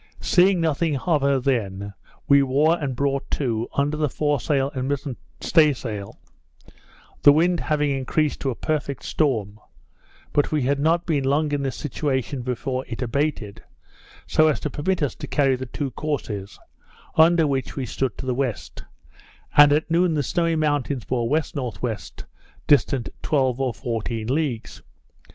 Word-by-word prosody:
Seeing 185 0 +4
nothing 160 -2 0
of 150 +2 +1
her 140 -1 +2
then, 100 -7 -2 0.3
we 140 0 +6
wore 140 +5 +3
and 135 -3 -2
brought 140 +1 -1
to, 115 -5 -1
under 145 +2 +1
the 150 -1 0
fore 145 +2 0
sail 135 +1 0
and 130 -1 -3
mizen 140 -2 -2 0.3
stay 155 -3 +4
sail, 105 -6 -7 1.0
the 145 - +8
wind 170 +4 +3
having 150 -2 0
increased 140 +3 0
to 135 - -1
a 125 - -2
perfect 145 -3 -3
storm; 110 -9 -1 0.7
but 145 - +2
we 150 -3 +1
had 140 +2 +1
not 165 +4 +2
been 150 -5 0
long 145 +3 +1
in 145 -1 0
this 135 -3 -2
situation 135 -2 -2
before 130 +1 -3
it 120 +1 -4
abated, 125 -4 -2 0.6
so 155 - +3
as 155 - +1
to 150 - -3
permit 165 +4 -1
us 140 - 0
to - - -8
carry 135 -2 +2
the 130 +1 -6
two 135 +2 -4
courses, 115 -10 -4 0.6
under 165 +1 +5
which 135 -3 -2
we 135 - -3
stood 125 -1 -2
to - - -6
the 130 - 0
west; 125 -3 -3 0.7
and 145 0 +8
at 155 +2 +1
noon 170 -1 +3
the 145 - 0
Snowy 165 +3 0
Mountains 145 -5 0
bore 120 -2 -1
W.N.W., 125 - -2 0.7
distant 140 -3 +2
twelve 135 -3 +1
or 130 -2 +1
fourteen 115 +1 -4
leagues. 130 -2 -2
140 Hz, 160 wpm, -23 LUFS, 125-150 Hz, 1.0 s, the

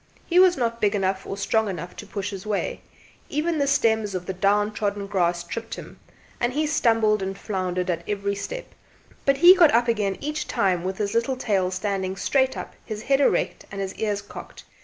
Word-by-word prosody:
He 355 +1 +3
was 365 -1 +6
not 235 -2 -1
big 210 0 +2
enough 190 -1 -1
or 195 - -4
strong 220 +1 +1
enough 180 -1 -6
to - - -8
push 200 0 -4
his 195 -1 -7
way 210 -1 -2 0.5
even 310 +2 0
the 280 - +2
stems 220 -6 +2
of 180 -1 -4
the 190 - -3
down 205 +3 +2
trodden 205 -1 -2
grass 175 -3 0
tripped 225 +6 -6
himand 240 +1 -7
he 305 +3 +1
stumbled 225 -8 +2
and 195 0 -3
floundered 185 -3 -2
at 170 -2 -1
every 200 -1 -1
step, - - -6 0.5
but 275 0 +3
he 350 +5 +9
got 340 -5 +6
up 235 +1 +3
again 210 -4 0
each 300 +1 -3
time 185 -3 +1
with 190 +1 -3
his 205 0 -2
little 235 +3 0
tail 195 -7 +1
standing 190 0 -2
straight 265 +6 +1
up, - - -7
his 215 -1 -6
head 275 +2 +2
erect, - - +1
and 195 - -6
his 195 -1 -3
ears 205 -2 -2
cocked. - - -11
205 Hz, 200 wpm, -24 LUFS, 195-240 Hz, 0.5 s, he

